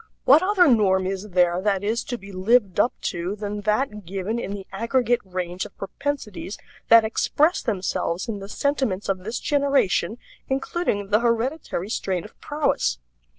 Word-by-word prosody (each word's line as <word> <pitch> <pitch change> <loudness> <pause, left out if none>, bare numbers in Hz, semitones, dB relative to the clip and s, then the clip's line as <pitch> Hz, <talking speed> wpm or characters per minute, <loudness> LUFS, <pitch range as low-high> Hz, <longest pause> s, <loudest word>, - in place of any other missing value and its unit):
What 285 +5 +7
other 370 -2 +4
norm 195 -7 +4
is 195 +2 -3
there 180 -1 +2
that 200 -1 0
is 225 +3 0
to 245 - -4
be 200 -2 -12
lived 200 +1 +2
up 235 - +4
to 175 +3 -2
than 210 0 -4
that 210 0 0
given 195 +5 -3
in 200 - -4
the 200 -1 -6
aggregate 240 +4 +1
range 180 -1 -4
of - - -11
propensities 210 -2 -4 0.3
that 230 -1 +8
express 300 +9 +2
themselves 185 -2 -2
in 215 -3 -3
the 195 0 -9
sentiments 260 -7 -1
of 190 -1 0
this 220 +6 -4
generation, 275 - +1 0.3
including 265 - -1
the 210 - +5
hereditary 235 - -1
strain 185 -6 -1
of 215 - -13
prowess? 290 - 0
210 Hz, 160 wpm, -24 LUFS, 190-250 Hz, 0.3 s, that